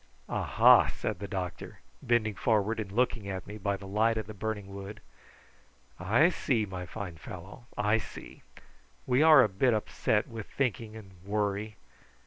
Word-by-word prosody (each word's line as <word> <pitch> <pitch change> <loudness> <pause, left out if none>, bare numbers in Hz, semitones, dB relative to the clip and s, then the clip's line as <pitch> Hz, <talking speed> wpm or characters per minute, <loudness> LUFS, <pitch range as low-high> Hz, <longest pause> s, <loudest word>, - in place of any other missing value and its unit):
"Aha!" - - +5
said 105 -5 -4
the 100 - -5
doctor, 90 -4 -6 0.2
bending 110 -3 +1
forward 110 +3 +1
and 100 -3 -5
looking 115 -2 0
at 95 -1 -5
me 105 +2 -9
by 100 0 -1
the 100 - -11
light 110 +3 +1
of 110 - -3
the 110 - -9
burning 105 -1 -5
wood, 100 +2 -8 1.0
"I 110 - +4
see, 120 -10 0
my 90 -2 -7
fine 95 -6 -7
fellow, 95 - -10
I 105 +2 +2
see. 95 - -10 0.6
We 130 +2 +2
are 155 -4 +8
a - - +3
bit 110 +5 +2
upset 105 0 0
with 115 -4 -8
thinking 115 -4 -2
and 105 -4 -11
worry. 105 +1 -2
105 Hz, 160 wpm, -29 LUFS, 100-115 Hz, 1.0 s, are